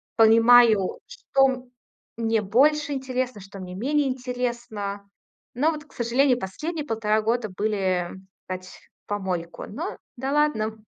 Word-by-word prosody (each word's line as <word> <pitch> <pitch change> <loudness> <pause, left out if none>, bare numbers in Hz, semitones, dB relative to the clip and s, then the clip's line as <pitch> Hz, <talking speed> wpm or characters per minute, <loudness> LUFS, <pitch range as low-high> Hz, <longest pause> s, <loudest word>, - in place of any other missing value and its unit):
Понимаю, 225 -2 +6
что 265 -2 +1 0.5
мне 225 -1 +1
больше 290 +8 +3
интересно, 255 -4 -3
что 195 +1 -11
мне 180 -1 -7
менее 280 +7 +1
интересно. 240 -6 -4 0.5
Но 300 +6 +3
вот, 300 -1 -7
к - - -23
сожалению, 250 +2 +2
последние 300 - -4
полтора 220 -3 +1
года 230 -1 0
были, 185 -3 -1 0.4
тать, 185 0 -5 0.4
в - - -70
помойку. 185 -4 -3
Но, 315 - -5 0.2
да 265 +3 -2
ладно. 225 -8 +1
235 Hz, 125 wpm, -25 LUFS, 205-265 Hz, 0.5 s, Понимаю